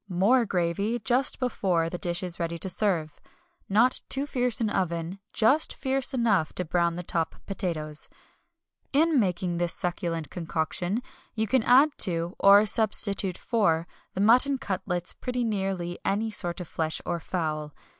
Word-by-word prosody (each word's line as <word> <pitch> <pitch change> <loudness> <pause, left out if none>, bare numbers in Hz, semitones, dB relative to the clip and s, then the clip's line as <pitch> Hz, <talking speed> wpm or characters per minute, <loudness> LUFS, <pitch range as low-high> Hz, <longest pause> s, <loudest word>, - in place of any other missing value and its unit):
More 210 +7 +3
gravy 190 +6 0
just 250 +3 +1
before 190 -10 0
the 175 +1 -5
dish 175 +1 -1
is 175 -2 -5
ready 170 0 -2
to 190 - -2
serve. 175 -7 -1 0.5
Not 230 +6 +3
too 275 +1 -1
fierce 250 -4 +1
an 220 -3 0
oven, 170 0 -2
just 270 +8 +2
fierce 265 -1 0
enough 225 - +1
to 180 - -2
brown 170 0 +1
the 180 - -5
top 165 -1 -2
potatoes. 160 -6 -4 0.8
In 310 0 +4
making 180 -4 0
this 175 0 +2
succulent 170 -4 -1
concoction 175 +5 -2 0.3
you 220 0 0
can 255 +4 +2
add 265 +7 +5
to, 170 -2 0
or 200 +1 +7
substitute 200 -3 +1
for, 170 -8 +1 0.3
the 190 - -1
mutton 250 +6 +4
cutlets 185 -7 -3
pretty 250 -1 -3
nearly 190 -5 -2
any 215 +3 0
sort 175 -3 -1
of 180 - -6
flesh 160 -1 -2
or 175 -1 -2
fowl. 155 -4 -3
190 Hz, 155 wpm, -27 LUFS, 170-230 Hz, 0.8 s, or